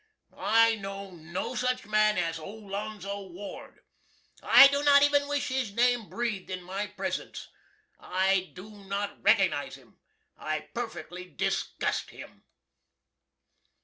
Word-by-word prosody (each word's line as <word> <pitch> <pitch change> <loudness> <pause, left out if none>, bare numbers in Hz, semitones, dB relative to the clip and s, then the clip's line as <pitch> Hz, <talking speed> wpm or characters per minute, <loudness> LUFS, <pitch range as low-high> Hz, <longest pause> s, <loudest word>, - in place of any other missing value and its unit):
I 230 +1 +4
know 195 -1 -7
no 170 0 -5
such 250 0 -1
man 215 0 +3
as 165 0 -1
Olonzo 200 +1 -6
Ward. 190 +4 -10 0.6
I 275 - +9
do 280 +1 +3
not 285 -1 +6
even 285 0 +3
wish 290 -1 -1
his 255 -5 -2
name 245 -2 +2
breathed 230 -5 -3
in 185 -1 -5
my 195 +3 -4
presents. - - -5 0.5
I 190 0 +1
do 195 +4 -10
not 200 0 -5
recognize - - +2
him. - - -20 0.4
I - - -3
perfectly 220 -6 -6
disgust - - -2
him. - - -13
205 Hz, 120 wpm, -28 LUFS, 195-240 Hz, 0.6 s, I